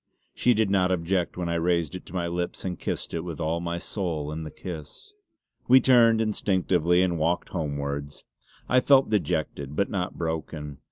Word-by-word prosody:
She 125 Hz, -1 st, +3 dB
did 110 Hz, -2 st, +1 dB
not 95 Hz, -2 st, +3 dB
object 90 Hz, 0 st, 0 dB
when 90 Hz, -1 st, -2 dB
I 85 Hz, -, -1 dB
raised 85 Hz, -2 st, +1 dB
it 90 Hz, -, -8 dB
to -, -, -12 dB
my 90 Hz, -1 st, 0 dB
lips 85 Hz, +2 st, -3 dB
and 90 Hz, -2 st, -3 dB
kissed -, -, -4 dB
it 85 Hz, -, -1 dB
with 85 Hz, -3 st, -6 dB
all 80 Hz, +1 st, -1 dB
my 85 Hz, 0 st, -3 dB
soul 85 Hz, -5 st, -3 dB
in 80 Hz, +1 st, -4 dB
the 80 Hz, -, -6 dB
kiss! 85 Hz, -, -9 dB, 0.5 s
We 130 Hz, +2 st, +8 dB
turned 115 Hz, -4 st, +5 dB
instinctively 95 Hz, -5 st, +2 dB
and 85 Hz, -3 st, 0 dB
walked 85 Hz, +3 st, 0 dB
homewards. 70 Hz, -3 st, -4 dB, 0.4 s
I 125 Hz, -, +4 dB
felt 135 Hz, -1 st, +4 dB
dejected, 75 Hz, -7 st, -1 dB
but 100 Hz, -, 0 dB
not 95 Hz, -3 st, -3 dB
broken. 80 Hz, -3 st, -4 dB
85 Hz, 180 wpm, -26 LUFS, 80-95 Hz, 0.5 s, We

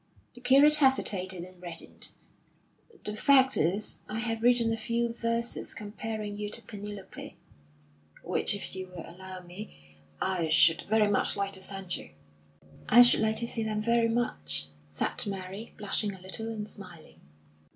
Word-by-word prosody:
The 245 Hz, -, -14 dB
curate 280 Hz, +4 st, +7 dB
hesitated 190 Hz, -, +2 dB
and 185 Hz, 0 st, -13 dB
reddened. 170 Hz, -2 st, -9 dB, 0.9 s
"The 210 Hz, -, -3 dB
fact 265 Hz, +2 st, +5 dB
is, 190 Hz, +7 st, 0 dB
I 215 Hz, -, -3 dB
have 225 Hz, -1 st, -1 dB
written 235 Hz, -1 st, +4 dB
a -, -, 0 dB
few 230 Hz, +1 st, -1 dB
verses 230 Hz, 0 st, -2 dB
comparing 210 Hz, 0 st, -5 dB
you 210 Hz, 0 st, -4 dB
to 235 Hz, -, 0 dB
Penelope, 205 Hz, -2 st, -8 dB, 0.9 s
which, -, -, 0 dB
if 200 Hz, -, -5 dB
you 185 Hz, 0 st, -5 dB
will 180 Hz, -3 st, -9 dB
allow 185 Hz, +1 st, -9 dB
me, 180 Hz, +5 st, -10 dB, 0.4 s
I 185 Hz, -4 st, 0 dB
should 160 Hz, +1 st, +5 dB
very 215 Hz, -1 st, +4 dB
much 205 Hz, 0 st, +2 dB
like 200 Hz, 0 st, -2 dB
to 190 Hz, -, -8 dB
send 190 Hz, -1 st, -2 dB
you." 75 Hz, -, -12 dB, 0.8 s
"I 245 Hz, +2 st, +9 dB
should 245 Hz, -, +6 dB
like 220 Hz, 0 st, +1 dB
to 235 Hz, -, -2 dB
see 230 Hz, -, -3 dB
them 215 Hz, -1 st, -1 dB
very 235 Hz, 0 st, +3 dB
much," 75 Hz, -, -1 dB, 0.2 s
said 75 Hz, -, -2 dB
Mary, 195 Hz, +2 st, -6 dB
blushing 205 Hz, -1 st, -1 dB
a -, -, -14 dB
little 190 Hz, +5 st, -2 dB
and 215 Hz, -2 st, -5 dB
smiling. 175 Hz, -, -13 dB
210 Hz, 160 wpm, -29 LUFS, 185-230 Hz, 0.9 s, I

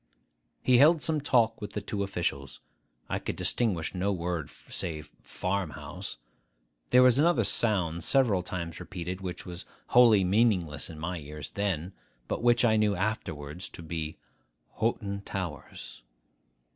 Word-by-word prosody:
He 125 Hz, -1 st, +5 dB
held 155 Hz, +2 st, +6 dB
some 155 Hz, -2 st, 0 dB
talk 115 Hz, -6 st, +2 dB
with 105 Hz, -1 st, -6 dB
the -, -, -2 dB
two 100 Hz, 0 st, -4 dB
officials. 85 Hz, -9 st, -3 dB, 0.5 s
I -, -, -2 dB
could -, -, -4 dB
distinguish 95 Hz, -10 st, +1 dB
no 95 Hz, +2 st, 0 dB
word 85 Hz, -4 st, -2 dB
save 80 Hz, -3 st, -5 dB
'Farm 95 Hz, -2 st, -2 dB
house.' -, -, -7 dB, 0.7 s
There 125 Hz, +1 st, +7 dB
was 125 Hz, +1 st, +5 dB
another 170 Hz, +3 st, +4 dB
sound 85 Hz, -7 st, +1 dB
several 120 Hz, -, +3 dB
times 85 Hz, -2 st, -5 dB
repeated, 90 Hz, +1 st, -6 dB
which 90 Hz, -1 st, -5 dB
was 90 Hz, +1 st, -7 dB, 0.3 s
wholly 115 Hz, -5 st, +6 dB
meaningless 90 Hz, -6 st, +2 dB
in 80 Hz, -, -9 dB
my 85 Hz, +3 st, -3 dB
ears 75 Hz, -1 st, -8 dB
then, 95 Hz, -3 st, -2 dB, 0.3 s
but -, -, -2 dB
which 120 Hz, 0 st, +4 dB
I 110 Hz, -2 st, +4 dB
knew 105 Hz, -1 st, +2 dB
afterwards 90 Hz, -5 st, -3 dB
to 85 Hz, -, -10 dB
be 80 Hz, -1 st, -4 dB, 0.6 s
'Hoghton 100 Hz, -3 st, -1 dB
Towers. 85 Hz, -12 st, -6 dB
95 Hz, 145 wpm, -29 LUFS, 85-110 Hz, 0.7 s, There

